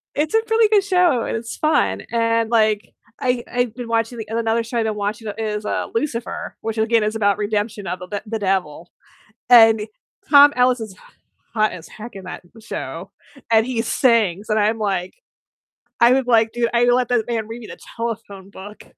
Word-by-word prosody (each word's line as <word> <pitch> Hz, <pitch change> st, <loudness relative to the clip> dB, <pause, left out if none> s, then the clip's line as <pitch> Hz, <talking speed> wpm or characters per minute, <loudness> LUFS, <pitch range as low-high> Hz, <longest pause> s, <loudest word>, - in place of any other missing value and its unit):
it's 300 Hz, +5 st, -1 dB
a 445 Hz, -, +4 dB
really 450 Hz, 0 st, +4 dB
good 415 Hz, -2 st, +4 dB
show, 360 Hz, -, +2 dB
and -, -, -2 dB
it's 230 Hz, 0 st, -7 dB
fun, 310 Hz, 0 st, +1 dB
and, 230 Hz, -1 st, +1 dB
like, 215 Hz, -2 st, +1 dB, 0.3 s
I 250 Hz, -1 st, 0 dB
I've 245 Hz, -2 st, -1 dB
been 245 Hz, -2 st, -7 dB
watching 230 Hz, +1 st, -1 dB
and 225 Hz, +1 st, -2 dB
another 230 Hz, 0 st, 0 dB
show 235 Hz, +1 st, -3 dB
I've 225 Hz, -, 0 dB
been 215 Hz, -, -1 dB
watching 210 Hz, +1 st, -3 dB
is, 215 Hz, -1 st, -3 dB
uh, -, -, -2 dB
Lucifer, 235 Hz, -1 st, -3 dB
which 225 Hz, 0 st, -4 dB
again 225 Hz, 0 st, +2 dB
is 215 Hz, +1 st, -1 dB
about 205 Hz, -2 st, +2 dB
redemption 210 Hz, 0 st, -2 dB
of 180 Hz, +1 st, -4 dB
the 180 Hz, -, -9 dB
d 205 Hz, +2 st, -4 dB
the 220 Hz, +1 st, -4 dB
devil. 185 Hz, -4 st, -2 dB, 0.6 s
And 225 Hz, -3 st, +6 dB, 0.4 s
Tom 285 Hz, 0 st, +8 dB
Ellis 250 Hz, -1 st, +3 dB
is 220 Hz, -2 st, -6 dB
h -, -, -22 dB, 0.5 s
hot 215 Hz, -1 st, +2 dB
as 170 Hz, -2 st, -10 dB
heck 220 Hz, +1 st, -11 dB
in 190 Hz, -, -10 dB
that -, -, -7 dB, 0.2 s
show, -, -, -7 dB, 0.4 s
and 220 Hz, 0 st, +4 dB
he 245 Hz, -2 st, -1 dB
sings, 220 Hz, -5 st, +1 dB
and 215 Hz, 0 st, +2 dB
I'm 215 Hz, +2 st, +1 dB
like, 195 Hz, -4 st, -2 dB, 0.9 s
"I 235 Hz, +1 st, +7 dB
would 265 Hz, -1 st, 0 dB
like 225 Hz, -2 st, +3 dB
to 240 Hz, -1 st, 0 dB
I 235 Hz, 0 st, +3 dB
would 245 Hz, -, +4 dB
let 250 Hz, -1 st, +1 dB
that 240 Hz, -3 st, +1 dB
man 225 Hz, -3 st, -2 dB
read 230 Hz, +2 st, -8 dB
me 220 Hz, -, -10 dB
the -, -, -10 dB, 0.2 s
telephone 220 Hz, -4 st, -5 dB
book." 205 Hz, +1 st, -11 dB
225 Hz, 200 wpm, -20 LUFS, 210-240 Hz, 0.9 s, Tom